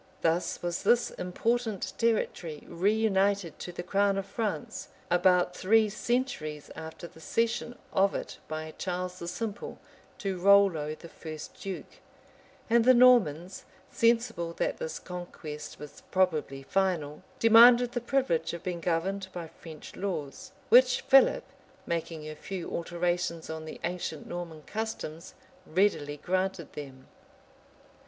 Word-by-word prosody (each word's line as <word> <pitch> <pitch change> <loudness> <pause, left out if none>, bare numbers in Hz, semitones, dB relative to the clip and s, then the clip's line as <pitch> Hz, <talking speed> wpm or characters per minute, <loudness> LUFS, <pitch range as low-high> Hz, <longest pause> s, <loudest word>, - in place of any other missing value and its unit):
Thus 165 +2 0
was 175 -1 -2
this 235 +3 +3
important 220 +3 -2
territory 180 -9 0
reunited 200 -2 +1
to 180 - -6
the 175 0 -6
crown 200 +2 +2
of 195 - -2
France, 200 -5 -4 0.2
about 180 0 +3
three 215 +3 +4
centuries 200 - -2
after 160 +2 -8
the 165 - -13
cession 230 +6 -1 0.2
of 195 +1 +3
it - - -5
by 155 0 -5
Charles 180 -1 -3
the 170 - -6
Simple 205 +4 -5 0.4
to 195 -3 -3
Rollo, 185 -6 +4
the 170 - -12
first 155 -2 -8
duke; 195 -2 -7 0.7
and 235 0 +4
the 255 +2 +6
Normans, 195 -9 +4 0.3
sensible 230 -7 +1
that - - -2
this 485 -1 -4
conquest 175 -4 -8
was 150 -1 -11
probably 155 -7 0
final, 165 -4 0 0.2
demanded 235 +2 +7
the 245 -1 -2
privilege 240 - 0
of 170 0 -7
being 175 -2 -3
governed 185 +3 -1
by 175 -2 -6
French 155 -2 -11
laws; 155 -9 -4 0.2
which 250 +2 +6
Philip, 270 0 +5 0.4
making 165 -2 -3
a 155 - -5
few 185 +2 -6
alterations 170 -1 -2
on 160 0 -6
the 155 - -8
ancient 175 -3 -3
Norman 170 -3 -6
customs, 210 -7 -5 0.3
readily 155 -5 +1
granted 185 0 -2
them. 135 -3 -9
180 Hz, 130 wpm, -29 LUFS, 160-215 Hz, 0.7 s, demanded